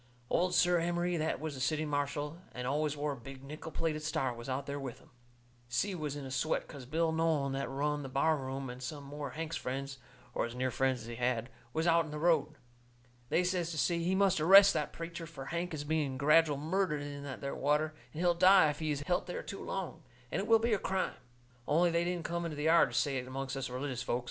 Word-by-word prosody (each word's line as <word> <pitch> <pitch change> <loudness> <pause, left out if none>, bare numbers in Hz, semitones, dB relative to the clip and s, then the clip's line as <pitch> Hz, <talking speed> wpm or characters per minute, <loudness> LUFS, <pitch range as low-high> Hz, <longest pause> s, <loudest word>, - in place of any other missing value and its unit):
Old 180 0 +2
Si 175 - +5
Emery, 175 0 +1
that 160 0 -1
was 155 -1 -4
the 130 - -6
city 155 +4 +1
marshal, 145 +2 -2
and 125 - -5
always 150 +2 0
wore 145 +1 -1
a - - -4
big 135 +2 -10
nickel 150 +3 -8
plated 155 0 -1
star, 135 -4 -1
was 120 +2 -8
out 130 +1 -2
there 140 0 -4
with 130 -4 -6
'em. - - -21 0.6
Si 155 +12 0
was 150 -5 -3
in 145 -2 -6
a 130 - -7
sweat, 135 +5 0
'cause 135 -4 -10
Bill 160 +3 +1
Nolan, 160 -4 +1
that 135 0 -2
run 145 +2 -1
the 135 - -6
bar 150 +5 +2
room, 135 -1 -4
and 125 +1 -8
some 140 +3 -5
more 145 +1 -6
of 130 - -9
Hank's 165 0 -3
friends, 135 +1 -4 0.3
or - - 0
as 120 - -9
near 130 0 0
friends 130 -1 +1
as - - -9
he 115 0 -7
had, 120 0 0 0.2
was 160 +3 -1
out 170 -1 +4
in - - -9
the 150 - -5
road. 155 -2 +2 0.7
They 180 - +3
says 180 -2 0
to 165 - -5
Si 170 +4 +1
he 185 +2 +1
must 190 -4 +3
arrest 195 +4 +9
that - - -1
preacher, 165 0 -6
fur 145 -5 -8
Hank 170 +4 -3
is 150 -3 -4
being 145 -3 -1
gradual 150 +1 +4
murdered 155 0 0
in 145 0 -6
that 140 -2 -6
there 140 -1 -3
water, 150 +2 +1 0.2
and 155 - -5
he'll 175 -1 +4
die 185 -2 +6
if 145 - -9
he's 150 -3 -1
helt 175 +6 0
there 180 - -4
too 195 - -7
long, 190 -4 -4 0.3
and - - 0
it 205 - -4
will 225 - +7
be 230 +1 +1
a 205 - +2
crime. 190 -1 -1 0.5
Only 170 +3 +4
they 170 +1 +2
didn't 175 -1 -2
come 170 0 -2
into 160 -3 -4
the 150 - -3
yard 165 +2 +5
to - - -6
say 135 +3 +1
it 125 0 -4
amongst 135 +1 -4
us 135 -1 -3
religious 130 0 -3
folks. 125 -1 0
150 Hz, 245 wpm, -33 LUFS, 135-170 Hz, 0.7 s, arrest